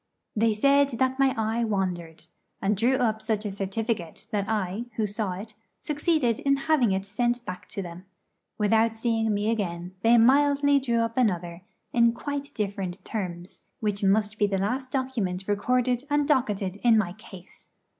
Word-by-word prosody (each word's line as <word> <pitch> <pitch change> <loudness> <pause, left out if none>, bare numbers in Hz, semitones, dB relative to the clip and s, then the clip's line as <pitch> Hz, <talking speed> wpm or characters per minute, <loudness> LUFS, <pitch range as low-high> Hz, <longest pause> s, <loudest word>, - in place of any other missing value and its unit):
They 220 0 +2
said 280 +5 +4
that 260 +2 +1
my 270 -1 +3
eye 225 +2 0
wandered, 180 -6 -2 0.3
and 200 +2 +1
drew 240 +6 +2
up 220 -4 0
such 220 -1 -1
a 205 - -2
certificate 195 -2 -3
that 200 -1 -1
I, 210 +1 -1
who 220 - 0
saw 205 -2 -2
it, 210 +4 -8 0.3
succeeded 295 -6 0
in 275 0 +2
having 285 -9 +3
it 190 0 -1
sent 240 +4 -1
back 180 - -7
to 200 -1 -5
them. 175 +1 -9 0.5
Without 225 +1 +2
seeing 225 -1 0
me 210 +2 +1
again, 180 -5 -3
they 230 +2 +5
mildly 285 +3 +4
drew 235 -3 0
up 230 +1 -2
another 175 -7 0 0.3
in 235 -1 +4
quite 285 +3 -5
different 195 -3 -4
terms, 180 -4 -5 0.2
which 205 -2 -2
must 210 +1 +2
be 205 - +4
the 195 -1 -1
last 250 +7 -2
document 225 -9 -2
recorded 245 +4 +1
and 290 0 +2
docketed 205 - 0
in 230 +1 +4
my 185 -5 0
case. 190 -3 -14
220 Hz, 165 wpm, -26 LUFS, 195-245 Hz, 0.5 s, they